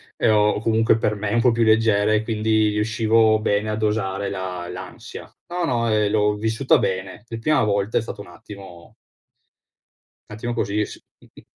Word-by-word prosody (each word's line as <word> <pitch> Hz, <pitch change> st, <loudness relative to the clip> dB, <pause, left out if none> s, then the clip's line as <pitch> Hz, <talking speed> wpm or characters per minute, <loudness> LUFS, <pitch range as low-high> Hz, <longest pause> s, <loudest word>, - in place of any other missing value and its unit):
e -, -, +1 dB
ho 105 Hz, -1 st, +3 dB
comunque 110 Hz, 0 st, +2 dB
per 105 Hz, -1 st, -1 dB
me 105 Hz, +1 st, -3 dB
un 115 Hz, -, +2 dB
po' 125 Hz, -, +4 dB
più 115 Hz, 0 st, +1 dB
leggere 110 Hz, -1 st, +3 dB
e 105 Hz, -, 0 dB
quindi 110 Hz, -1 st, +1 dB
riuscivo 110 Hz, +1 st, +2 dB
bene 105 Hz, 0 st, 0 dB
a -, -, -1 dB
dosare 105 Hz, -2 st, -2 dB
la 90 Hz, -2 st, -5 dB
l'ansia. 90 Hz, 0 st, -9 dB, 0.2 s
No, 175 Hz, 0 st, -2 dB
no, 120 Hz, -4 st, 0 dB
ehm, 105 Hz, -1 st, +2 dB
l'ho 105 Hz, -1 st, +2 dB
vissuta 110 Hz, +5 st, +1 dB
bene. 95 Hz, +2 st, -3 dB
La 115 Hz, -, -6 dB
prima 150 Hz, +3 st, +2 dB
volta 100 Hz, 0 st, 0 dB
è -, -, +2 dB
stata 110 Hz, -2 st, -8 dB
un -, -, -12 dB
attimo 90 Hz, -1 st, -13 dB, 1.4 s
un 105 Hz, -, -8 dB
attimo 120 Hz, +2 st, -4 dB
così 105 Hz, -2 st, -1 dB
s -, -, -12 dB, 0.2 s
mh-mh. -, -, -19 dB
105 Hz, 180 wpm, -22 LUFS, 100-115 Hz, 1.4 s, po